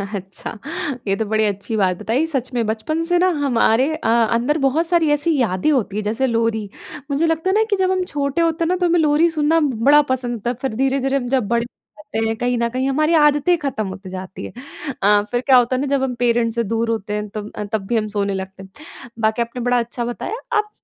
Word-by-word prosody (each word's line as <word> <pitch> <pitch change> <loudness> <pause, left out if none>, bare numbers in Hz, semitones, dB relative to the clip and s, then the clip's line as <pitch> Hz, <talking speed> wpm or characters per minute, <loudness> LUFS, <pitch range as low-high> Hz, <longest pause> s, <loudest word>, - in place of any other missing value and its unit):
अच्छा 195 +3 -7 0.5
ये 195 - +2
तो 220 - -2
बड़ी 215 +1 +1
अच्छी 200 +2 -3
बात 185 -3 +1
बताई। 250 - 0
सच 265 -5 -3
में, 235 -2 0
बचपन 310 +10 -2
से 350 +1 +2
ना 370 - +4 0.2
हमारे 255 +2 +2
अ, 315 - -2
अंदर 235 +5 +2
बहुत 320 +5 +1
सारी 335 -3 +3
ऐसी 295 +2 +2
यादें 200 -1 +1
होती 220 -7 0
हैं 215 - -2
जैसे 230 +6 0
लोरी, 230 -3 0 0.4
मुझे 290 +4 +1
लगता 325 +3 0
है - - +2
ना 440 - +4
कि 410 - +3
जब 375 0 +1
हम 370 -1 +1
छोटे 285 0 -1
होते 330 0 +1
हैं 330 - 0
ना 365 - +2
तो 360 -1 0
हमें 345 0 +3
लोरी 310 +2 +3
सुनना 320 +1 +2
बड़ा 285 +1 +4
पसंद 245 -2 -1
होता 235 +2 -3
है - - 0
फ़िर 265 -5 -2
धीरे-धीरे 270 +2 +1
जब 255 -4 0
बड़े 235 +1 +1
हो 305 +5 -19
जाते 225 -7 -2
हैं 225 - -1
कहीं 245 0 0
न 235 0 0
कहीं 260 +3 -1
हमारी 305 +4 +2
आदतें 295 +4 +4
ख़त्म 255 -9 -3
होती 190 0 -8
जातीं 185 0 -7
हैं। - - -9 0.5
अ, 205 +1 +5
फ़िर 245 - 0
क्या 260 0 +5
होता 245 +1 +3
है 255 - -1
ना 285 - -1
जब 265 - 0
हम 250 -2 -2
पेरेंट्स 235 -1 +2
से 235 - +1
दूर 230 +2 -1
होते 210 -2 -2
हैं 210 0 -2
तब 210 0 -7
अ, - - -4
तब 200 -3 -1
भी 240 - +1
हम 215 -1 -1
सोने 200 -1 0
लगते 190 0 -6
हैं। 210 +12 -15 0.4
बाकी 220 +2 +1
आपने 235 +1 -4
बड़ा 245 0 +2
अच्छा 235 +1 -3
बताया। 240 - -4 0.2
आप 425 0 0
245 Hz, 245 wpm, -20 LUFS, 220-295 Hz, 0.5 s, अ